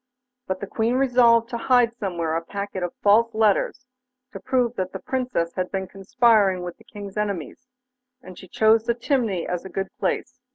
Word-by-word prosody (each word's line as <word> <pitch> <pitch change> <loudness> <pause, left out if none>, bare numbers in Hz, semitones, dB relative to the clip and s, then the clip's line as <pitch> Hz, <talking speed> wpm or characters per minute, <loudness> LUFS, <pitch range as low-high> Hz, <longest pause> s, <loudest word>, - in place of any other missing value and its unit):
But 190 0 -3
the - - -3
Queen 225 +4 -1
resolved 240 -3 +4
to 235 - -4
hide 245 -2 +3
somewhere 170 -7 -2
a 165 - -2
packet 200 +1 -5
of 175 -1 -4
false 225 +3 +4
letters 220 +3 +1 0.5
to - - -8
prove 250 -3 0
that 185 -2 -3
the - - -5
Princess 250 -11 -2
had 185 -1 -3
been 190 -1 -2
conspiring 195 -2 +2
with 175 -1 -7
the 225 - -19
King's 205 -3 -9
enemies, 205 - -4 0.5
and 185 -8 -12
she 185 - -12
chose 220 +4 +3
the 235 - +1
chimney 235 - -1
as 180 -1 -3
a 190 - -8
good 195 0 -5
place. 250 0 -2
210 Hz, 190 wpm, -23 LUFS, 185-235 Hz, 0.5 s, resolved